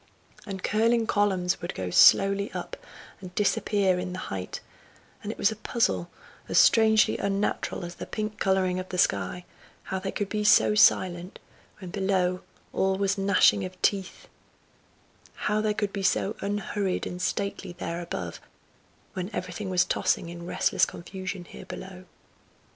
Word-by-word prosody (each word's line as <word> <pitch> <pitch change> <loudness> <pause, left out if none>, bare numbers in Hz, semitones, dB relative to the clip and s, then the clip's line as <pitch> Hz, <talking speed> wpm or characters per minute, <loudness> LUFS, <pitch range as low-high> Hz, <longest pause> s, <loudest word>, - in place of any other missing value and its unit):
And 190 -2 -6
curling 225 +2 +2
columns 190 -4 +1
would 175 - -5
go 90 -1 -4
slowly 200 - +5
up - - -5 0.4
and 180 -1 -11
disappear 200 -2 +1
in 180 0 -4
the - - -5 0.2
height; 95 -1 -5 0.6
and 205 - -4
it - - -9
was 205 - +3
a - - -5
puzzle, 210 - -1 0.4
as - - +1
strangely 220 -1 +5
unnatural 200 -2 -1
as 175 - -7
the - - -8
pink 215 -1 -4
colouring 190 -1 +1
of 185 - -7
the 185 - -4
sky, 100 - 0 0.4
how 190 - -3
they 190 +1 -4
could 205 - -2
be 210 +1 -2
so 210 0 +5
silent, 185 -3 +3 0.4
when 185 -4 -9
below 185 -2 0 0.3
all 190 0 +1
was 200 0 +1
gnashing 200 0 +4
of 185 0 -7
teeth; 195 -2 -1 1.1
how 210 +1 0
they 215 -1 0
could 205 -2 -2
be 200 - -3
so 195 +2 +1
unhurried 200 -1 -2
and 180 0 -6
stately 195 -1 -2
there 175 -1 -5
above, 90 - -6 0.7
when 185 0 -4
everything 185 +2 -4
was 180 -1 +3
tossing 170 - 0
in 170 0 -8
restless - - +1
confusion 185 +1 -3
here 185 - -11
below. 185 -1 -9
190 Hz, 155 wpm, -27 LUFS, 180-205 Hz, 1.1 s, slowly